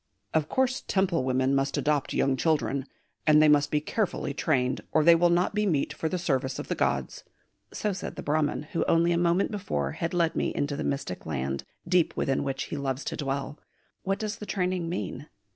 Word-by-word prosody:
"Of 155 -1 +1
course, 260 0 +1
Temple 190 -7 +1
women 130 +1 +1
must 135 0 +1
adopt 145 -2 0
young 135 -1 +2
children; 140 -2 0 0.4
and 150 0 +7
they 155 - +6
must 145 -1 +4
be 150 - +2
carefully 175 -2 -2
trained, 130 -4 0
or 155 - +3
they 170 +2 +8
will 175 +1 +4
not 175 +3 +2
be 210 0 +1
meet 150 -4 0
for 160 +1 -2
the 185 - -1
service 135 -6 -1
of - - -6
the - - +1
gods." - - -1 0.5
So 210 -2 -1
said 180 - -6
the - - -6
Brahman 150 0 0
who - - +1
only 170 +1 +3
a 170 - +2
moment 175 +4 +2
before 185 - -2
had 165 - -3
led 165 -2 +2
me - - -1
into 145 0 -1
the - - -3
mystic 140 - -3
land, 70 -2 -3 0.2
deep 175 -2 +2
within 135 - 0
which 135 -1 -2
he - - -5
loves 135 0 -2
to - - -3
dwell: 140 +1 -3 0.4
what 195 +1 -1
does 215 +1 -3
the 210 - -8
training 180 -3 -1
mean? 170 -3 -4
155 Hz, 210 wpm, -27 LUFS, 135-175 Hz, 0.5 s, they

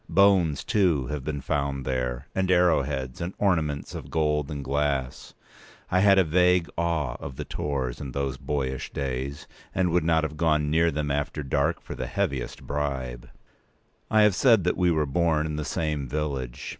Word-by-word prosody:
Bones, 95 -7 +4
too, 85 -10 +2
had 75 0 -4
been 70 0 -3
found 70 -1 -2
there, 65 -2 -2
and 95 -1 0
arrow 90 -4 +4
heads, 65 +1 -4
and 85 +3 -4
ornaments 80 -7 0
of - - -7
gold 75 -2 0
and 70 -2 -5
glass. 70 -2 -2 0.6
I 95 - +3
had 100 0 +6
a 95 - +6
vague 90 +1 +3
awe 80 -7 -1
of 70 - -7
the - - -5
Tors 65 -3 -3
in 70 -3 -5
those 70 +1 -2
boyish 70 -1 -3
days, 70 +1 -4 0.3
and 90 -2 +2
would 85 -1 +2
not 80 0 +2
have 75 -1 -4
gone 75 -2 +2
near 85 +2 +4
them 75 -1 -2
after 75 +1 -2
dark 70 +4 0
for - - -7
the - - -4
heaviest 65 -3 -3
bribe. 65 -4 -3 0.8
I 110 -1 +5
have 105 -2 +5
said 115 -1 +4
that 90 - +1
we 90 -1 +2
were 80 -3 +2
born 80 +1 +1
in 75 -1 -3
the 75 - -2
same 75 -1 -2
village. 70 -4 -3
75 Hz, 180 wpm, -26 LUFS, 70-85 Hz, 0.8 s, had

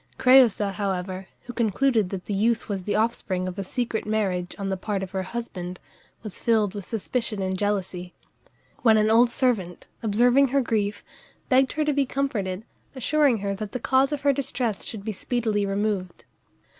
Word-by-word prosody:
Crëusa, 245 -6 +5
however, 190 -1 -3 0.2
who 245 - -8
concluded 230 -2 +1
that 190 -1 -5
the 205 - -3
youth 225 +4 +1
was 195 -4 -4
the 205 - 0
offspring 210 -4 0
of 185 +2 -5
a - - -1
secret 230 +3 -2
marriage 190 -5 -1
on 195 -1 -3
the 190 - 0
part 195 +1 -3
of 190 - -7
her 190 - -2
husband, 185 -4 -6 0.4
was 215 -4 -6
filled 215 -4 +2
with 200 -3 -6
suspicion 225 0 -2
and 190 0 -1
jealousy; 185 -3 -2 0.7
when 220 -3 +5
an 215 0 +3
old 235 +2 +6
servant, 230 -8 0
observing 245 +5 +4
her 275 +2 +2
grief, 210 -4 -1 0.5
begged 260 -1 +4
her 305 0 0
to 300 - +2
be 280 -1 +1
comforted, 220 -8 -2 0.3
assuring 280 0 +3
her 200 - 0
that 210 +1 -6
the 250 - -2
cause 265 +3 +2
of 295 -2 -2
her 285 -1 +3
distress 245 -5 -2
should 210 -3 -7
be 220 - -1
speedily 215 -1 -1
removed. 195 -3 -2
215 Hz, 180 wpm, -25 LUFS, 195-245 Hz, 0.7 s, old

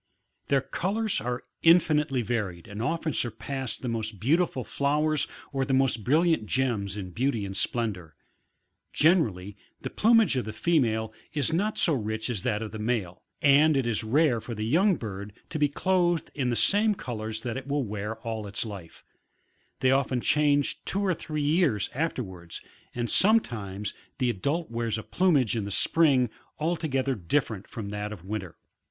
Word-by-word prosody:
Their 140 -1 +3
colours 200 - -1
are 125 +1 -3 0.2
infinitely 150 -6 +4
varied 105 -7 -3
and 100 +2 -6
often 160 +3 -1
surpass 130 +3 -2
the 130 - -6
most 110 -3 -3
beautiful 145 - +1
flowers 150 +4 +1 0.3
or 135 -1 0
the 135 0 +1
most 130 -5 +1
brilliant 155 - +2
gems 110 -7 0
in 95 -3 -6
beauty 115 +1 -1
and 95 - -5
sfden 115 +2 0
dour. 80 -5 -13 0.8
Generally, 105 - +2 0.2
the - - -5
plumage 225 -7 +4
of 125 - -1
the 110 - -5
female 110 -6 +1 0.2
is 145 0 +1
not 205 +6 0
so 165 - +4
rich 110 -1 -2
as 105 -6 -2
that 110 -1 -1
of 110 - -6
the 110 - -7
male, 105 -6 -2 0.2
and 145 +1 +5
it 135 - +1
is 115 -1 0
rare 125 +1 +2
for 115 - -6
the 105 0 -3
young 180 - +3
bird 100 -5 -7 0.2
to 155 - -3
be 145 -1 +3
clothed 175 +1 +1
in 130 -4 -1
the 120 - 0
same 205 - +3
colours 110 - -5
that 120 -2 -3
it 135 0 -6
will 145 0 0
wear 105 0 -4
all 110 -2 -4
its 100 +3 -3
life; 100 -6 -9 0.8
they 130 - +4
often 135 -1 +1
change 145 +1 +2
two 200 +1 0
or 185 - +2
three 155 -2 -4
years 145 - +2
afterwards, 95 - -4 0.4
and 120 -1 -1
sometimes 110 - +2 0.2
the 125 -3 +1
adult 140 - -2
wears 115 -2 -1
a 110 - -6
plumage 150 - +2
in 110 -3 -2
the - - -4
spring, 135 - +3 0.3
altogether 150 -5 0
different 110 - -1
from 105 -3 -6
that 105 0 -4
of 95 -4 -9
winter. 95 -4 -5
125 Hz, 170 wpm, -27 LUFS, 110-150 Hz, 0.8 s, and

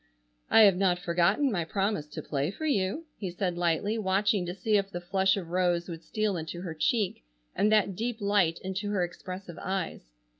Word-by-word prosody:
"I 225 - +7
have 200 -4 +7
not 185 -2 +2
forgotten 180 +10 +2
my 175 -5 0
promise 195 -2 -1
to 150 - -7
play 140 +1 -1
for 315 +11 -6
you," 235 - 0
he 195 - -3
said 180 0 -2
lightly, 175 +6 0
watching 195 -1 +1
to 175 - -4
see 215 +1 +1
if 195 -1 -1
the 175 - -5
flush 190 +2 +1
of 175 -4 -5
rose 175 -1 +1
would 165 -1 -6
steal 215 -3 -1
into 160 +1 -5
her 175 -3 -5
cheek, 195 - 0 0.3
and 210 - +2
that 205 -3 +3
deep 230 +3 -3
light 200 -5 +2
into 190 +2 -3
her 200 -3 +1
expressive 185 0 -7
eyes. 185 - -3
190 Hz, 195 wpm, -29 LUFS, 175-205 Hz, 0.3 s, I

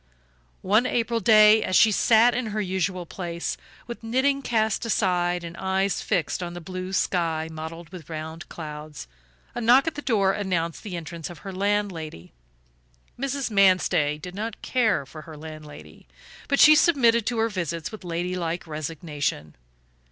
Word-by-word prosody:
One 215 +6 +3
April 230 -1 0
day, 215 +1 +6
as 185 - -1
she 220 - +6
sat 230 +3 +4
in 245 -1 -2
her 215 0 -3
usual 185 -2 -2
place, 170 -1 -4 0.3
with 235 - -8
knitting 265 +4 +1
cast 220 -4 0
aside 180 -5 0
and 170 0 -7
eyes 190 +1 0
fixed 170 +1 -1
on 175 -1 -5
the - - -5
blue 185 +2 -6
sky 165 -4 0
mottled 160 +1 -8
with 175 -4 -11
round 160 +1 -7
clouds, 150 - -8 0.5
a - - -4
knock 245 +4 +5
at 325 - -1
the 290 - -6
door 200 -8 +2
announced 175 -5 -2
the 195 -5 -6
entrance 165 0 -7
of 175 0 -12
her 195 - -5
landlady. 185 - -2 0.9
Mrs. 275 -2 -2
Manstey 185 -7 +3
did 180 +4 -9
not 215 +2 -6
care 220 - +1
for 155 +3 -11
her 155 -1 -11
landlady, 155 -1 -11 0.4
but 280 - +1
she 310 - +9
submitted 240 -8 +4
to 240 - -1
her 225 0 +2
visits 170 -5 -4
with 215 -2 -10
ladylike 175 0 -3
resignation. 150 - -4
185 Hz, 160 wpm, -25 LUFS, 165-220 Hz, 0.9 s, she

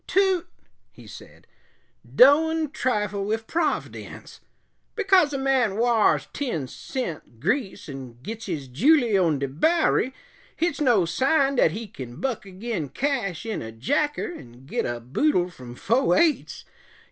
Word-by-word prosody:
"Toot," 375 -2 +2 0.4
he - - -16
said, - - -13 0.6
"doan 320 - +4
trifle 210 -9 -1
wif 220 +2 -2
Prov'dence. 320 +3 -3 0.6
Because 380 -8 +4
a 275 - -2
man 265 -6 +1
wars 230 -2 +3
ten 200 - -3
cent 165 - -6
grease 195 - -2
'n' 130 -4 -9
gits 225 +4 -6
his 155 -7 -4
july 235 - +3
on 170 -6 +3
de 140 0 -2
Bowery, 265 - +2 0.4
hit's 325 -3 -1
no 240 -10 +4
sign 270 - +2
dat 165 - +5
he 225 +3 -5
kin 130 - -9
buck 250 -6 -3
agin 190 - -4
cash 230 - -2
in 220 -2 -3
a 110 - -7
jacker 290 - -1
'n' 120 - -13
git - - -2
a 120 0 -3
boodle 180 - 0
from 125 -6 -11
fo' 230 - +2
eights. 330 -3 +1
225 Hz, 140 wpm, -24 LUFS, -, 0.6 s, dat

